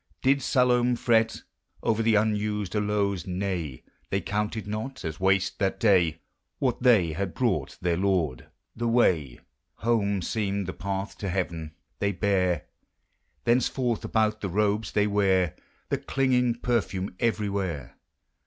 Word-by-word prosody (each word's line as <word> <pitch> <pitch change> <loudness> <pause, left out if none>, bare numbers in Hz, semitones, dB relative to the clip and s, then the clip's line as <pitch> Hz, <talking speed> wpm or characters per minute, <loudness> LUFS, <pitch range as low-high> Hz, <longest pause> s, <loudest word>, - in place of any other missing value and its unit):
Did 135 +1 +4
Salome 125 -1 +3
fret 115 -2 +2 0.4
Over 115 0 +1
the 115 -1 +3
unused 105 -1 0
aloes? 100 -2 0
Nay! 90 -7 -3
' - - -40
They - - +1
counted 105 +1 -2
not 110 +3 -5
as 80 -1 -4
wash', 95 0 +2
that 95 -1 -1
day. 90 -7 +3 0.4
What 130 -3 0
(hey 105 -11 +4
had 95 +2 -3
brought 95 - 0
their 85 -1 +1
Lord. 90 -9 0 0.3
The 120 +1 -2
way 85 - +2 0.3
Home 100 -4 0
seemed 100 -1 -1
the 95 - -4
path 95 +1 -4
i<> - - 0
heaven. 85 -4 -3 0.2
They 100 0 +1
bare, 90 -4 +1 0.8
Thenceforth, 120 0 +1
about 110 -1 +1
the 100 - -2
cobes 105 +2 0
they 105 - +3
ware 95 -4 +2 0.4
The - - 0
clinging 125 -3 +1
perfume 100 -6 -1
everywhere. 100 - -1
100 Hz, 135 wpm, -27 LUFS, 90-115 Hz, 0.8 s, Did